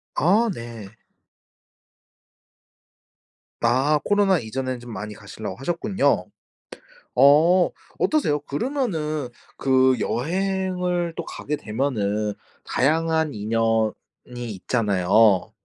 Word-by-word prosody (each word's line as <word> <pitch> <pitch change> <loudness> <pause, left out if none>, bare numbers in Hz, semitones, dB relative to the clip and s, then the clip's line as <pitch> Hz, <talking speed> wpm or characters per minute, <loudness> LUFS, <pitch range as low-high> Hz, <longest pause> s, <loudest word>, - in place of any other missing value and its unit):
아 210 +8 +3
네. 115 -5 -8 2.7
아 135 +6 +3
코로나 200 -4 +3
이전에는 130 +2 -4
좀 120 0 -10
많이 105 0 -6
가시려고 105 -1 -8
하셨군요. 175 +8 0 0.9
어 160 +7 +5 0.3
어떠세요? 265 - +1
그러면은 155 - -2 0.3
그 130 -1 +3
여행을 180 +3 -1
또 170 - -5
가게 150 - -4
되면은 105 -5 -1 0.3
다양한 160 +2 +1
인연이 110 +1 +1 0.6
있잖아요. 100 0 +2
135 Hz, 190 characters per minute, -23 LUFS, 110-175 Hz, 2.7 s, 어